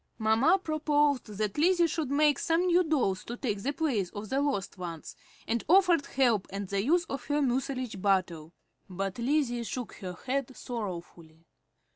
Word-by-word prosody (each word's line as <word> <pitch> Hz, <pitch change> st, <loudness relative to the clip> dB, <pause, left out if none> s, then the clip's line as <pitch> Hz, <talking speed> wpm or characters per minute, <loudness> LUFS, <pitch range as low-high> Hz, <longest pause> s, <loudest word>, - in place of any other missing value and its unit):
Mamma 225 Hz, -, +4 dB
proposed 295 Hz, -5 st, +1 dB
that 210 Hz, +3 st, -3 dB
Lizzie 350 Hz, +2 st, +4 dB
should 320 Hz, -3 st, -2 dB
make 295 Hz, +1 st, +3 dB
some 330 Hz, +2 st, +1 dB
new 360 Hz, 0 st, +4 dB
dolls 260 Hz, -, 0 dB
to 240 Hz, -, -6 dB
take 210 Hz, -7 st, -2 dB
the 275 Hz, -, -1 dB
place 270 Hz, -, -1 dB
of 205 Hz, 0 st, -6 dB
the 270 Hz, +1 st, +1 dB
lost 200 Hz, -10 st, -2 dB
ones, 170 Hz, -3 st, -7 dB, 0.3 s
and 235 Hz, 0 st, -1 dB
offered 355 Hz, -3 st, +4 dB
help 235 Hz, -7 st, +2 dB
and 195 Hz, 0 st, -5 dB
the 200 Hz, 0 st, 0 dB
use 340 Hz, +7 st, +2 dB
of 275 Hz, -5 st, -6 dB
her 290 Hz, 0 st, 0 dB
mucilage 255 Hz, -5 st, -1 dB
bottle; 180 Hz, -5 st, 0 dB, 0.4 s
but 195 Hz, +3 st, -4 dB
Lizzie 245 Hz, -1 st, +1 dB
shook 245 Hz, 0 st, -5 dB
her 185 Hz, -3 st, -6 dB
head 265 Hz, 0 st, -2 dB
sorrowfully. 170 Hz, -7 st, -7 dB
250 Hz, 165 wpm, -29 LUFS, 200-295 Hz, 0.4 s, Mamma